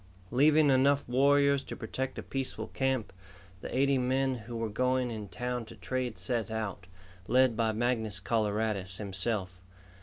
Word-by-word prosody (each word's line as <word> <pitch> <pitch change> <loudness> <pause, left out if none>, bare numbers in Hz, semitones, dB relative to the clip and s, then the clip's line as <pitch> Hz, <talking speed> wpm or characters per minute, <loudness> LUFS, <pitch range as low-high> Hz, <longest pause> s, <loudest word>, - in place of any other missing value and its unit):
Leaving 145 +3 +5
enough 140 +2 +3
warriors 140 +2 +4
to - - -7
protect 130 +3 -4
a - - -5
peaceful 135 -1 -4
camp, 130 -6 -1 0.5
the - - -4
eighty 135 0 +3
men 130 +1 +1
who 120 -1 -7
were 115 0 -1
going 125 +3 0
in 105 -2 -5
town 125 +4 -3
to 115 +1 -12
trade 120 +5 -3
set 120 -3 -2
out, 110 -5 -4 0.4
led 130 -2 +4
by 110 -1 +1
Mangus 110 -3 0
Coloradus 105 -2 -1
himself. 95 -2 -2
120 Hz, 150 wpm, -30 LUFS, 110-130 Hz, 0.5 s, Leaving